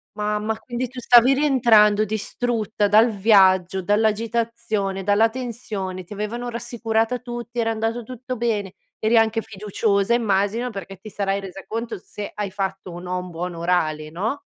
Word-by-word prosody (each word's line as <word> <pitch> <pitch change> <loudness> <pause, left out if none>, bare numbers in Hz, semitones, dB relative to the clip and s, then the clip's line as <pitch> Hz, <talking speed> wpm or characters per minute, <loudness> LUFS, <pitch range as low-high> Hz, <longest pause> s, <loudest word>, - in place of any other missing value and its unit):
Mamma, 210 +1 -1
quindi 245 0 -4
tu 255 -1 -8
stavi 245 +2 +6
rientrando 235 -7 +4
distrutta 215 0 -1
dal 220 +3 +5
viaggio, 190 -3 +4
dall'agitazione, 220 -1 0
dalla 205 +3 +4
tensione, 220 -6 -5
ti 175 - -27
avevano 220 +4 -4
rassicurata 235 0 -1
tutti, 240 0 -6
era 225 -1 +1
andato 225 +2 -2
tutto 255 +2 -6
bene, 215 -5 -1 0.3
eri 225 +2 +3
anche 225 0 +3
fiduciosa 205 0 0
immagino, 220 +1 +1
perché 195 -3 -8
ti 205 +4 -11
sarai 200 -1 -1
resa 195 -1 -9
conto 230 +3 -4
se 205 +2 -8
hai 205 -2 -3
fatto 195 -2 -4
o 175 - -7
no 180 0 -3
un 180 - -7
buon 175 +1 -5
orale, 160 -3 0
no. 215 - -3
215 Hz, 150 wpm, -22 LUFS, 195-235 Hz, 0.3 s, stavi